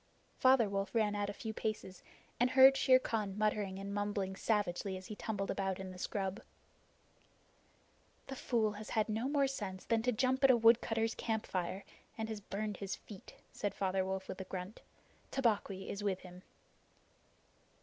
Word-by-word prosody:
Father 255 Hz, -4 st, +5 dB
Wolf 195 Hz, +2 st, -3 dB
ran 215 Hz, -2 st, +3 dB
out 205 Hz, -1 st, -1 dB
a -, -, -4 dB
few 220 Hz, +1 st, -5 dB
paces 215 Hz, -4 st, -4 dB, 0.4 s
and 245 Hz, +1 st, +4 dB
heard 265 Hz, +1 st, +8 dB
Shere 260 Hz, -1 st, +6 dB
Khan 210 Hz, -6 st, -2 dB
muttering 210 Hz, -2 st, 0 dB
and 200 Hz, +1 st, -5 dB
mumbling 205 Hz, -2 st, -1 dB
savagely 195 Hz, -2 st, 0 dB
as 185 Hz, -, -10 dB
he 215 Hz, -, -7 dB
tumbled 205 Hz, -2 st, -3 dB
about 195 Hz, -1 st, -2 dB
in 190 Hz, -1 st, -6 dB
the 180 Hz, -, -10 dB
scrub. 195 Hz, +2 st, -2 dB, 1.8 s
"The 270 Hz, -, -6 dB
fool 230 Hz, -4 st, +1 dB
has 210 Hz, +1 st, -8 dB
had 215 Hz, 0 st, +1 dB
no 225 Hz, +5 st, -1 dB
more 285 Hz, -1 st, +3 dB
sense 205 Hz, -9 st, -4 dB
than 230 Hz, -1 st, +2 dB
to 250 Hz, +2 st, +1 dB
jump 260 Hz, +3 st, +1 dB
at 270 Hz, -, +7 dB
a 255 Hz, -, +7 dB
woodcutter's 225 Hz, 0 st, +4 dB
campfire, 195 Hz, -4 st, -2 dB, 0.3 s
and 220 Hz, 0 st, -3 dB
has 215 Hz, -2 st, -5 dB
burned 205 Hz, 0 st, -4 dB
his 195 Hz, -1 st, -4 dB
feet," 200 Hz, -4 st, -12 dB, 0.2 s
said 205 Hz, -2 st, -3 dB
Father 190 Hz, -1 st, 0 dB
Wolf 190 Hz, 0 st, -3 dB
with 185 Hz, -, -5 dB
a -, -, -6 dB
grunt. 185 Hz, +3 st, -6 dB, 0.5 s
"Tabaqui 210 Hz, -7 st, 0 dB
is 200 Hz, +1 st, -4 dB
with 195 Hz, -2 st, 0 dB
him." 180 Hz, 0 st, -11 dB
210 Hz, 170 wpm, -35 LUFS, 195-225 Hz, 1.8 s, heard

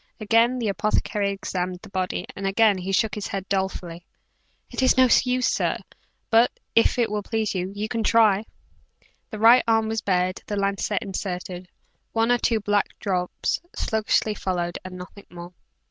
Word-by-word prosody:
Again 230 Hz, +3 st, +3 dB
the 235 Hz, -3 st, -2 dB
apothecary 200 Hz, +1 st, 0 dB
examined 185 Hz, -2 st, -4 dB
the 215 Hz, -, -11 dB
body, 185 Hz, -2 st, -2 dB
and 195 Hz, 0 st, -3 dB
again 205 Hz, 0 st, +3 dB
he 185 Hz, +2 st, -4 dB
shook 210 Hz, +2 st, +1 dB
his 210 Hz, -, -4 dB
head 195 Hz, -1 st, -5 dB
dolefully. 190 Hz, -3 st, -3 dB, 0.7 s
"It's 260 Hz, 0 st, +2 dB
no 260 Hz, 0 st, +6 dB, 0.2 s
use, 250 Hz, 0 st, +1 dB
sir: -, -, 0 dB, 0.5 s
but, 230 Hz, +2 st, +5 dB, 0.2 s
if 230 Hz, -, +3 dB
it 235 Hz, -3 st, +1 dB
will 210 Hz, 0 st, -1 dB
please, 220 Hz, 0 st, -2 dB
you 195 Hz, +3 st, -3 dB
can 225 Hz, 0 st, -2 dB
try." 215 Hz, -2 st, +4 dB, 0.8 s
The 215 Hz, -, -6 dB
right 230 Hz, +4 st, +6 dB
arm 225 Hz, -1 st, +2 dB
was 225 Hz, 0 st, -2 dB
bared; 185 Hz, -1 st, 0 dB
the 205 Hz, -, -3 dB
lancet 200 Hz, +1 st, -1 dB
inserted, 185 Hz, -2 st, -5 dB, 0.5 s
one 225 Hz, +1 st, +2 dB
or 245 Hz, -, +3 dB
two 225 Hz, -1 st, +1 dB
black 205 Hz, 0 st, 0 dB
drops 180 Hz, -3 st, -2 dB
sluggishly 220 Hz, 0 st, 0 dB
followed 175 Hz, -3 st, -3 dB
and 185 Hz, 0 st, -8 dB
nothing 185 Hz, +2 st, -11 dB
more. 175 Hz, 0 st, -10 dB
205 Hz, 160 wpm, -24 LUFS, 185-225 Hz, 0.8 s, no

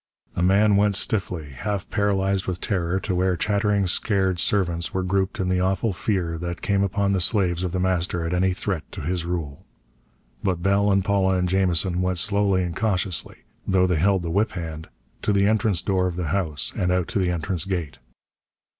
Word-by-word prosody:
A -, -, -1 dB
man 100 Hz, +3 st, +4 dB
went 100 Hz, 0 st, +3 dB
stiffly, 90 Hz, -8 st, -1 dB
half 100 Hz, +6 st, -4 dB
paralyzed 100 Hz, -2 st, 0 dB
with 90 Hz, -1 st, -2 dB
terror, 90 Hz, -2 st, -1 dB
to 95 Hz, -, -2 dB
where 90 Hz, 0 st, +1 dB
chattering 100 Hz, +1 st, +1 dB
scared 95 Hz, -1 st, +1 dB
servants 85 Hz, -4 st, 0 dB
were 95 Hz, -, 0 dB
grouped 95 Hz, 0 st, -1 dB
in 95 Hz, -, 0 dB
the 90 Hz, 0 st, +1 dB
awful 95 Hz, +3 st, 0 dB
fear 90 Hz, -4 st, -2 dB
that 85 Hz, 0 st, -5 dB
came 100 Hz, -1 st, +1 dB
upon 100 Hz, 0 st, +1 dB
the 95 Hz, -, +1 dB
slaves 90 Hz, -2 st, +1 dB
of 90 Hz, -, -2 dB
The 90 Hz, -, -2 dB
Master 90 Hz, -2 st, 0 dB
at 80 Hz, -, -2 dB
any 95 Hz, +1 st, +2 dB
threat 90 Hz, -2 st, -3 dB
to -, -, -6 dB
his 85 Hz, +2 st, -2 dB
rule. 80 Hz, -5 st, -4 dB, 0.8 s
But 90 Hz, -3 st, -1 dB
Bell 100 Hz, +1 st, +3 dB
and 95 Hz, -1 st, +2 dB
Paula 95 Hz, -2 st, +2 dB
and 90 Hz, 0 st, +1 dB
Jamison 90 Hz, -1 st, +1 dB
went 90 Hz, -1 st, 0 dB
slowly 100 Hz, 0 st, +1 dB
and 85 Hz, -2 st, -4 dB
cautiously 95 Hz, -5 st, -1 dB, 0.2 s
though 95 Hz, -1 st, +3 dB
they 90 Hz, -2 st, +1 dB
held 95 Hz, +1 st, +2 dB
the 85 Hz, -, -3 dB
whip 105 Hz, +4 st, +1 dB
hand 80 Hz, -3 st, -6 dB, 0.3 s
to -, -, 0 dB
the 100 Hz, -1 st, +3 dB
entrance 105 Hz, -4 st, +1 dB
door 95 Hz, -2 st, +1 dB
of 90 Hz, -, -4 dB
the 85 Hz, -4 st, -3 dB
house, 80 Hz, -5 st, -1 dB
and 90 Hz, 0 st, 0 dB
out 90 Hz, -2 st, +1 dB
to -, -, -1 dB
the 90 Hz, -2 st, +1 dB
entrance 85 Hz, 0 st, -1 dB
gate. 90 Hz, -7 st, -4 dB
95 Hz, 200 wpm, -24 LUFS, 85-100 Hz, 0.8 s, man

